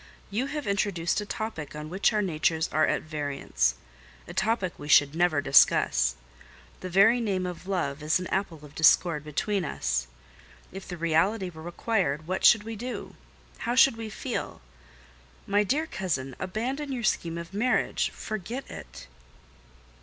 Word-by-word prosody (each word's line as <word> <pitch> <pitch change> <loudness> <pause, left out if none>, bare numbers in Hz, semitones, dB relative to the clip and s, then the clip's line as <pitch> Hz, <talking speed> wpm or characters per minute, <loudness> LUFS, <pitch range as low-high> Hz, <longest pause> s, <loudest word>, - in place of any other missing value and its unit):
You 240 +7 -1
have 295 0 -4
introduced 200 -2 0
a 210 - -7
topic 185 -12 -5
on 150 0 -6
which 190 +8 +1
our 210 -2 +1
natures 160 -2 0
are 155 +1 +2
at - - 0
variance—a 60 - -3
topic 195 -3 -1
we 145 - -8
should 145 -1 +5
never 165 -3 +2
discuss: 60 - +4 0.6
the 185 - -6
very 200 +7 +5
name 195 -5 -1
of 180 0 -7
love 160 -7 -2
is 155 +3 +2
an 185 - -5
apple 170 -6 -2
of 145 - -14
discord 160 0 +4
between 185 +6 -1
us. - - -2 0.6
If 195 +1 -9
the 175 - -6
reality 180 +4 +1
were 160 -1 -11
required, 175 -3 -1
what 185 +2 -3
should 215 - +7
we 225 +1 -6
do? 245 +4 -6 0.5
How 240 +1 -1
should 260 -1 +6
we 225 -1 -6
feel? 240 +3 -4 0.9
My 205 +1 +2
dear 285 +10 0
cousin, 145 - -3
abandon 255 +10 -3
your 245 -3 -3
scheme 170 -5 0
of 170 +2 -8
marriage—forget 220 0 -1
it." - - -10
180 Hz, 155 wpm, -27 LUFS, 155-215 Hz, 0.9 s, should